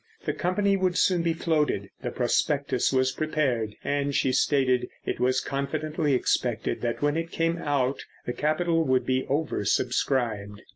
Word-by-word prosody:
The - - 0
company 195 +2 +1
would 185 -1 0
soon 180 -3 +3
be 165 -1 +1
floated, 150 - 0
the 125 - -2
prospectus 130 +2 +1
was 130 -1 +2
prepared, 130 -8 -1
and, 140 -1 -1
she 130 - +2
stated, 130 -2 +2 0.2
it - - -2
was 130 +1 +2
confidently 150 +2 -1
expected 120 -2 0
that 120 +3 -2
when 145 0 +2
it 165 0 -2
came 165 +1 0
out 140 -4 0 0.2
the 120 - -2
capital 165 +3 +1
would 130 -3 +1
be 130 0 0
over 145 -5 -1
subscribed. 105 -3 0
140 Hz, 155 wpm, -26 LUFS, 125-160 Hz, 0.2 s, soon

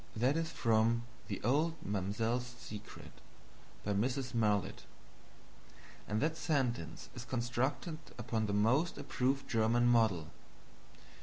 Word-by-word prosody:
That 125 +6 +2
is 165 -1 0
from 115 0 +2 0.2
THE 100 - -3
OLD 150 +8 +2
MAMSELLE'S 110 +5 -1
SECRET, 110 -4 -9 0.7
by 105 - 0
Mrs. 125 +5 0
Marlitt. 105 -4 +1 1.2
And 105 +1 0
that 160 +1 +1
sentence 135 -7 -1
is 120 - -7
constructed 130 +6 -1 0.2
upon 115 -2 -1
the - - -1
most 125 +12 +3
approved 135 -1 0
German 115 +1 +3
model. 110 -9 +3
120 Hz, 110 wpm, -35 LUFS, 110-130 Hz, 1.2 s, most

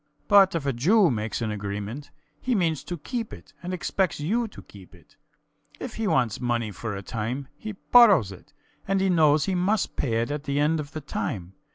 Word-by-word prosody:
But 195 -3 +6
if 160 -4 -2
a 140 - +1
Jew 175 - +4
makes 110 -1 -2
an 110 - -1
agreement, 105 +6 -5 0.3
he 250 -1 0
means 165 -6 0
to 175 - -4
keep 230 - -4
it - - -12
and 175 +1 -5
expects 185 -1 -1
you 225 +11 0
to 210 - -13
keep 95 -2 -15
it. 90 - -22 0.6
If 255 - -6
he 225 -1 -2
wants 125 - +1
money 120 -3 -1
for 105 +2 -5
a 100 - -6
time, 125 +6 -4
he 215 +8 -7
borrows 200 - +5
it 95 - -13 0.4
and 195 0 +1 0.2
knows 150 -2 +4
he 195 - -1
must 185 +3 0
pay 115 -4 0
it 120 - -5
at 145 0 -4
the 140 0 0
end 155 +2 +2
of 150 +1 -6
the 155 - -5
time. 95 -9 -4
145 Hz, 205 wpm, -25 LUFS, 115-190 Hz, 0.6 s, But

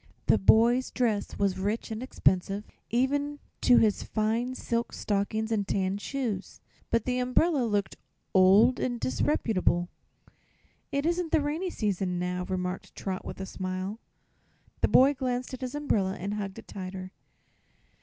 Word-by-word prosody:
The 110 - +4
boy's 235 - +4
dress 225 -5 -1
was 195 -2 0
rich 210 +4 -2
and 220 +1 -4
expensive, 195 -5 +1 0.3
even 285 +4 0 0.2
to 245 - +6
his 215 -2 +3
fine 230 +4 -1
silk 235 -2 -2
stockings 215 +2 -1
and 205 -3 0
tan 195 0 0
shoes; 225 -6 -4 0.3
but 230 -2 +1
the 250 0 0
umbrella 255 +2 +2
looked 205 -3 -1 0.4
old 200 +7 +6
and 245 -1 -1
disreputable. 195 - +1 1.0
"It 280 +1 0
isn't 340 -1 0
the - - +4
rainy 305 +6 -2
season 190 - -1
now," 180 0 -2
remarked 180 0 -4
Trot, 190 -1 -4
with - - -7
a 190 - -3
smile. 185 +3 -4 0.8
The - - +3
boy 270 +3 +6
glanced 255 -1 -3
at 260 - -6
his 255 +2 -4
umbrella 205 -10 0
and 200 +3 -3
hugged 200 -2 -4
it - - -11
tighter. 185 -1 -7
220 Hz, 145 wpm, -28 LUFS, 190-255 Hz, 1.0 s, to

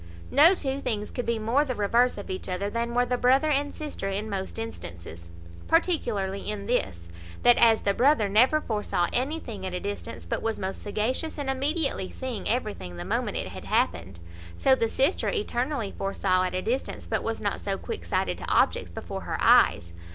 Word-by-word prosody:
No 320 +7 +7
two 275 -4 -3
things 210 -5 -3
could 245 - -4
be 235 -1 +1
more 230 +7 +2
the 260 -4 -3
reverse 235 +4 +2
of 205 - -6
each 185 - -4
other 195 +3 -2
than 235 +1 -2
were 245 0 +3
the 245 0 -1
brother 265 +5 +4
and 285 0 +1
sister 295 -10 -5
in 205 +2 -3
most 190 -1 -4
instances; 85 - -8 0.4
particularly 230 - 0
in 205 -1 -4
this, 85 - -1 0.4
That 240 - +6
as 225 -2 +5
the 200 - +1
brother 250 -2 +3
never 250 +10 +4
foresaw 210 - -1
anything 250 -6 -2
at 185 -1 -4
a - - -2
distance, 205 +1 -6
but - - -2
was 225 -1 -1
most 190 0 -4
sagacious 240 +11 -2
in 285 -2 -3
immediately 275 - 0
seeing 255 -5 -4
everything 210 - -2
the 85 - -6
moment - - -1
it - - -3
had - - -9
happened; 90 0 0 0.4
so 265 - +4
the 230 -3 +1
sister 275 +10 +1
eternally 260 - -2
foresaw 185 -1 0
at 185 - -3
a 185 - -2
distance, 250 +4 -2
but - - -1
was 225 0 -3
not 205 - -2
so 195 -1 -2
quick 85 - -6
sighted 85 - -1
to - - -6
objects - - +2
before - - -6
her - - -3
eyes. 85 0 +4
225 Hz, 195 wpm, -27 LUFS, 195-265 Hz, 0.4 s, No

